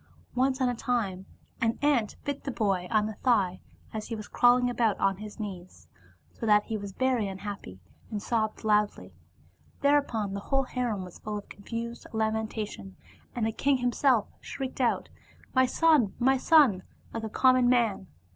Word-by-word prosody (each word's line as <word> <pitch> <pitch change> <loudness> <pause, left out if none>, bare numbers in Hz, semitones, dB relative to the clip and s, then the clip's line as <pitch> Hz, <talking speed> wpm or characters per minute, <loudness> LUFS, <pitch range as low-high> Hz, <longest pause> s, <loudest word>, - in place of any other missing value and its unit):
Once 260 +1 +1
on 260 - +2
a 245 - +1
time 215 -6 -2 0.3
an 230 0 +1
ant 260 -8 +2
bit 285 -1 -3
the - - -4
boy 195 -7 0
on 215 -2 +2
the 215 - -4
thigh 205 -6 +1 0.3
as 215 -1 -4
he 230 - -4
was 215 -1 -7
crawling 245 0 +4
about 235 -4 +1
on 195 -1 +2
his 210 +2 -9
knees, 185 -4 -8 0.5
so - - -13
that 210 -1 +5
he 220 - -4
was 200 -2 -5
very 255 -1 +1
unhappy 195 - -7 0.3
and 210 - -3
sobbed 215 0 -1
loudly. 210 -1 +1 0.7
Thereupon 275 -8 +2
the 200 - -3
whole 270 +6 0
harem 245 -6 -2
was 180 - -12
full 210 0 -4
of 205 - -9
confused 230 +3 -6
lamenta* 220 -1 -1
tion, 95 - -11 0.4
and 235 -2 0
the 225 - 0
king 275 +4 +1
himself 245 -1 +2
shrieked 265 -1 -5
out 240 - +1 0.2
' - - -27
My 260 -1 +4
son 300 -9 +3
I - - -2
my 265 0 +5
son 300 -2 +6
1 185 -1 -8 0.2
* - - -28
like 225 - -4
a - - -4
common 255 +1 +4
man. 230 -6 +2
225 Hz, 185 wpm, -28 LUFS, 205-250 Hz, 0.7 s, son